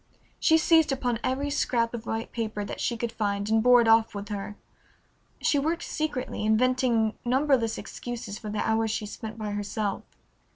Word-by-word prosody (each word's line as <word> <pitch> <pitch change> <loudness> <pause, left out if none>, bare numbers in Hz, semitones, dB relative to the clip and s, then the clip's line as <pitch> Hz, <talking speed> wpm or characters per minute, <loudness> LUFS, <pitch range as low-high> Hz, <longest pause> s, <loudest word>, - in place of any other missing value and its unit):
She 320 - +5
seized 320 -1 +4
upon 245 -4 -1
every 280 +3 -1
scrap 235 -5 0
of 230 -1 -6
white 225 0 -3
paper 215 -3 -3
that - - -6
she 235 - -1
could 235 0 -3
find 205 -3 -2
and 220 0 +4
bore 245 +1 +6
it 230 - +1
off 225 -1 +4
with 205 +1 -6
her. 205 0 -5 0.9
She 290 - +3
worked 330 +4 -1
secretly, 290 -8 -3
inventing 230 0 +2
numberless 255 -2 +2
excuses 230 -4 -6
for 215 - -7
the 210 0 -2
hours 220 0 +1
she 215 0 -2
spent 220 +1 -7
by 215 -2 -4
herself. 205 0 -2
230 Hz, 175 wpm, -27 LUFS, 215-255 Hz, 0.9 s, bore